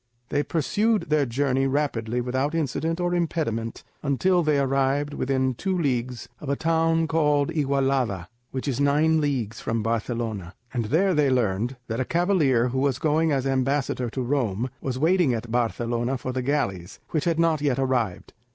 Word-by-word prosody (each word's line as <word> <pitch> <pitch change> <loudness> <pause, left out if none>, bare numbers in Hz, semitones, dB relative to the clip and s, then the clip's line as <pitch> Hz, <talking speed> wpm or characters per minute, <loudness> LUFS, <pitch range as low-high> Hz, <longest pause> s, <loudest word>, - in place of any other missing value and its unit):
They 145 - +1
pursued 205 +5 0
their 150 -3 +3
journey 135 +2 +1
I - - +2
rapidly 125 -4 -1
without 130 +5 -1
accident 165 +2 -1
or 175 0 0
impediment 155 -10 -2 0.2
until 175 +6 +2
they 155 -3 +2
arrived 135 +1 +1
within 130 -1 0
two 190 +9 -2
leagues 125 -5 -1
of 145 - -7
a 140 - +2
town 165 +1 +2
called 150 -3 +2
Igualada, 135 - 0 0.2
which 130 +2 -5
is 135 -2 -1
nine 155 +3 +3
leagues 125 -7 -1
from 115 -1 -1
Barcelona, 115 -4 -2 0.2
and 120 -3 -1
there 180 - +2
they 150 -3 +3
learned 120 -1 0
that 115 0 -3
a - - +2
cavalier 155 -9 +2
who 130 +2 -1
was 135 -2 +1
going 155 +2 +2
as 135 -2 0
ambassador 135 -1 0
to 130 +3 -3
Rome, 120 -3 -1
was 130 -2 -3
waiting 160 -3 +3
at 115 0 -6
Barcelona 120 +1 0
for 130 - -4
the 130 0 -2
galleys, 95 -10 -2
which 155 -3 0
had 170 -2 +1
not 165 -3 +2
yet 140 -4 +1
arrived. 125 -8 -1
135 Hz, 170 wpm, -25 LUFS, 120-155 Hz, 0.2 s, their